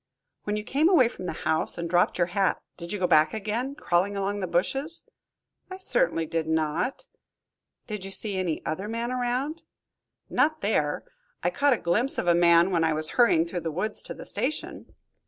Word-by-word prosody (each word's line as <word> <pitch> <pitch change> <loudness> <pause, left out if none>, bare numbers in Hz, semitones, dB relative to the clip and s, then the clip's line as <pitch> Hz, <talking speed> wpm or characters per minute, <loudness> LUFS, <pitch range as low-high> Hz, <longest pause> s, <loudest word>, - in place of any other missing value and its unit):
"When 210 - -1
you 210 - -3
came 290 +9 +2
away 300 -11 +5
from 185 -6 -7
the - - -1
house 160 0 0
and 170 0 -3
dropped 175 +1 +2
your 175 - +3
hat, 195 -3 +1 0.2
did 170 -1 -8
you 210 - -1
go 185 - 0
back 155 0 +4
again, 225 +6 -3
crawling 195 -2 0
along 200 +1 -1
by 185 - -2
the - - -13
bushes?" 270 - 0 0.7
"I 375 - -7
certainly 380 - +1
did 160 0 -2
not." 160 - -1 0.8
"Did 210 -4 -6
you 195 - -6
see 200 +1 +4
any 175 -4 -2
other 190 +6 -3
man 230 +2 -3
around?" 255 +6 -2 0.7
"Not 310 +1 +1
there. - - 0 0.4
I - - +1
caught 285 -1 +3
a - - 0
glimpse 225 +11 +1
of - - -1
a 175 - +4
man 170 +1 +5
when 170 -2 +2
I 160 -1 +2
was 155 0 -1
hurrying 200 -10 +4
through 175 +1 -4
the 165 - -3
woods 185 +7 -2
to - - -7
the - - -10
station." 255 +9 -4
195 Hz, 200 wpm, -26 LUFS, 170-245 Hz, 0.8 s, away